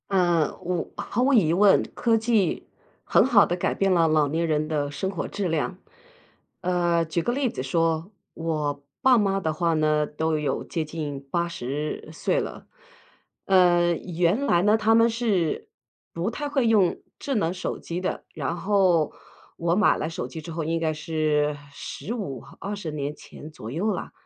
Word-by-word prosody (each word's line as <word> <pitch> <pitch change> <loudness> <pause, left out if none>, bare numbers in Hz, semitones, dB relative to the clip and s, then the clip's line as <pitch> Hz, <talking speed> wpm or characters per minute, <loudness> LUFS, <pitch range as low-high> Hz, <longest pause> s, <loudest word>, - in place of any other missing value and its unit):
呃， 175 -5 +2
我 180 -1 -3
毫 235 - -2
无 275 +2 +3
疑 170 -10 +4
问 195 +2 +5
科 230 -2 +2
技 220 -5 +1 0.4
很 - - +4
好 235 -6 +6
地 175 - -1
改 180 - 0
变 195 -1 +2
了 165 -2 +4
老 155 -2 +3
年 165 +4 0
人 155 -1 0
的 145 -2 -1
生 190 +6 -2
活 190 -4 -4
质 200 -2 -3
量。 165 +3 -1 0.8
呃， 175 -2 +1
举 165 +2 -1
个 240 - 0
例 270 -1 0
子 130 - -5
说， 165 +5 0 0.2
我 150 -3 -2 0.2
爸 260 -2 +6
妈 195 -2 +2
的 160 -4 -1
话 170 +1 +1
呢， 155 -1 +2
都 160 +1 -1
有 150 -1 -1
接 165 - -3
近 150 -3 -5
80 155 -4 -3
岁 330 - 0
了。 - - -6 0.8
呃， 175 -2 +4
原 175 +10 0
来 175 -10 +3
呢， 210 +2 +4
他 220 0 +3
们 230 +1 +5
是 220 -8 -1 0.4
不 170 +5 -1
太 290 +5 -4
会 270 -4 +1
用 205 -6 +3 0.2
智 275 - -2
能 175 -5 +1
手 185 - -4
机 170 +2 -5
的， 185 - -3
然 - - -3
后 180 -4 +2 0.4
我 170 0 +1
买 205 0 +4
了 155 - -2
手 145 -7 -4
机 145 +5 -8
之 165 - -8
后， 165 0 -3
应 165 +2 -1
该 160 -1 0
是 150 -1 0 0.2
15-20 200 - -6
年 145 0 -4
前 150 - -12
左 115 -7 -8
右 190 +10 0
啦， 180 - -5
170 Hz, 180 characters per minute, -25 LUFS, 155-200 Hz, 0.8 s, 好